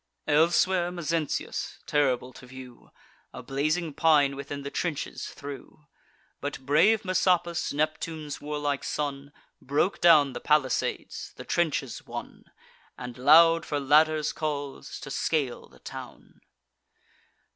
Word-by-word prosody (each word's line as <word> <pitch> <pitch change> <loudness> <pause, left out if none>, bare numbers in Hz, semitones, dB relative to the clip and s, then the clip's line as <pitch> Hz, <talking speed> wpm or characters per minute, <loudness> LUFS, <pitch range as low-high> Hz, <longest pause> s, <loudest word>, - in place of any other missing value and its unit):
Elsewhere 170 +3 +3
Mezentius, 165 -3 -3
terrible 130 -4 0
to 130 - -13
view, 130 -1 -12 0.4
A - - -8
blazing 155 +4 -1
pine 145 -3 +3
within 140 +1 -6
the 140 - -6
trenches 160 -5 -3
threw. 145 +1 -10 0.5
But 145 -1 -5
brave 205 +10 +4
Messapus, 175 -2 +1
Neptune's 155 0 -3
warlike 145 -1 -2
son, 140 -1 -4 0.3
Broke 145 +8 0
down 150 -6 +6
the - - -6
palisades, 150 -4 0
the - - -10
trenches 145 -6 -1
won, - - -8 0.5
And 125 -1 -7
loud 165 +6 +6
for 145 -3 -2
ladders 155 +2 +3
calls, 145 -3 -4
to 135 - -8
scale 140 -6 -1
the - - -19
town. - - -11
150 Hz, 115 wpm, -27 LUFS, 140-165 Hz, 0.5 s, down